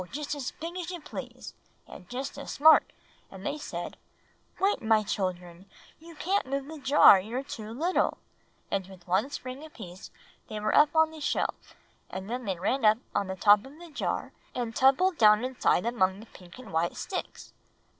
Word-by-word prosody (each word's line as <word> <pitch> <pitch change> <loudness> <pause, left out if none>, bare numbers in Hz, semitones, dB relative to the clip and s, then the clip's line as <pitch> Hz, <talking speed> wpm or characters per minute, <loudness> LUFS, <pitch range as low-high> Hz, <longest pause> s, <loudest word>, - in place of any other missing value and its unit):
just 295 0 -4
as 280 -4 -3
big 335 +3 -8
as 350 -1 -5
you 355 -1 -5
please, 300 - -8 0.3
and 180 - -13
just 265 +3 -5
as - - -8
smart; 315 +2 +6 0.4
and 195 0 -11
they - - -1
said, 300 - -6 0.6
'Wait, 395 +1 +2
my 220 -1 +3
children, 180 -2 -4 0.3
you 330 +1 -13
can't 375 0 0
move 275 0 -2
the 315 +1 -9
jar, 275 -8 +7
you're 230 +7 -4
too 230 -7 -7
little;' 325 +10 0 0.5
and 195 -2 -1
with 190 -2 -15
one 190 +9 +1
spring 260 0 -7
apiece 205 - -10 0.4
they 215 - -5
were 215 0 0
up 295 +1 +5
on 320 0 +4
the 315 -1 -11
shelf; - - -2 0.3
and 190 +3 -6
then 250 0 -3
they 190 -3 -2
ran 245 +9 -1
up 215 0 +6 0.2
on 200 - 0
the 190 - -4
top 205 +2 +5
of 275 +3 -13
the 340 -1 -12
jar, - - -3 0.2
and 235 -3 -3
tumbled 300 +7 +3
down 210 +2 +6
inside 255 -6 +1
among 190 -5 +1
the 220 - -11
pink 180 -3 -15
and 250 -8 -11
white 165 +2 0
sticks." 375 - -6
245 Hz, 185 wpm, -28 LUFS, 195-295 Hz, 0.6 s, jar